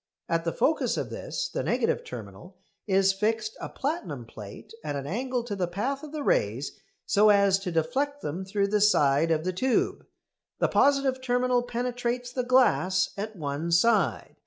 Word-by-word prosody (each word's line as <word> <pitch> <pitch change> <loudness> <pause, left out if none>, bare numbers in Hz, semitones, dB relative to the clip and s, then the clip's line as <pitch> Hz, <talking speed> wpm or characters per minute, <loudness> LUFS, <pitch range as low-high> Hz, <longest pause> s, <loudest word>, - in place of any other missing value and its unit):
At 165 0 0
the 165 - 0
focus 310 - +1
of - - -3
this, - - -4
the - - -3
negative 475 - 0
terminal, 460 - -10 0.3
is 195 0 +3
fixed 215 +2 -1
a - - -5
platinum 195 - -4
plate 110 - -11
at 145 -1 -3
an 140 -1 -4
angle 245 - -2
to 225 -4 -4
the 185 -3 -1
path 240 +11 -2
of 305 - -9
the 305 -2 -4
rays 120 - 0 0.3
so 210 +1 +4
as 200 -2 +4
to 190 -2 -4
deflect 270 - -1
them 170 +6 -3
through 200 +1 -1
the 210 0 +1
side 150 -6 +4
of 160 -1 +1
the 185 +1 -1
tube. 255 +7 0 0.5
The - - +1
positive 275 -2 +3
terminal 250 0 +1
penetrates 245 0 -3
the 255 - 0
glass 235 -7 +3
at 215 +2 -5
one 155 0 -3
side. 175 - +2
210 Hz, 175 wpm, -27 LUFS, 170-250 Hz, 0.5 s, so